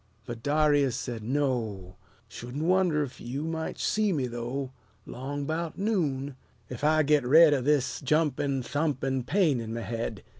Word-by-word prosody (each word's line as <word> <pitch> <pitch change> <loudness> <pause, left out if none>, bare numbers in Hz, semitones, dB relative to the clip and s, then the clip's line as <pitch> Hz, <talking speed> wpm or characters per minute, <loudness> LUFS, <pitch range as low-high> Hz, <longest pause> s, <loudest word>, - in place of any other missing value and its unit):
But 120 -2 -7
Darius 145 -2 +2
said, 120 -2 -5
"No! 115 -8 -2 0.3
Shouldn't 125 +6 -6
wonder 175 -3 +2
'f 135 - -8
yeou 130 +5 -4
might 160 0 -4
see 215 -1 +1
me, 145 -7 0
though, 125 +3 -4 0.3
'Long 140 +3 -5
'bout 160 +1 -3
noon, 145 - -1 0.4
ef 125 +2 -7
I 155 +1 +4
git 150 -1 +3
red 155 +4 +7
O' 135 - +1
this 135 -1 +1
jumpin', 140 -2 +1
thumpin' 135 -2 -1
pain 160 -11 +2
'n 115 0 -5
my 115 - -3
head." 115 -2 -4
140 Hz, 155 wpm, -28 LUFS, 125-155 Hz, 0.4 s, red